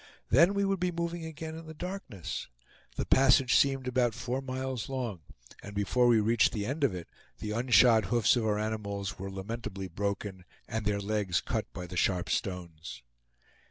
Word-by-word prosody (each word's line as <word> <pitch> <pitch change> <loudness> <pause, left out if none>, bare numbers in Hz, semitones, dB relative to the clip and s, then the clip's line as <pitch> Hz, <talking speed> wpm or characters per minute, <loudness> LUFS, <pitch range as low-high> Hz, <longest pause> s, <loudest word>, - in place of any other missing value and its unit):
Then 170 - +6
we 200 0 +2
would 195 -1 0
be 180 0 0
moving 170 0 -3
again 160 0 -6
in 165 0 -9
the 160 - -9
darkness. 175 - -5 0.5
The - - -2
passage 135 -1 +5
seemed 135 -2 +3
about 120 -3 +1
four 125 +2 -2
miles 130 -2 -4
long, 125 -8 -3 0.4
and 100 0 -9
before 120 +5 +2
we 115 -2 +5
reached 115 +2 +3
the 105 -2 -2
end 140 +6 -2
of 125 -9 +2
it, 85 -2 -7 0.3
the 105 - -5
unshod 120 -1 +5
hoofs 110 +3 +3
of 115 -3 0
our 105 -1 +1
animals 105 -2 -3
were 95 +1 -4
lamentably 95 0 -5
broken, 100 -1 -3 0.2
and 110 -2 -3
their 100 -1 +1
legs 100 -3 0
cut - - -3
by 90 - -6
the 90 +1 -7
sharp 90 0 +1
stones. 85 - -4
115 Hz, 180 wpm, -30 LUFS, 100-135 Hz, 0.5 s, Then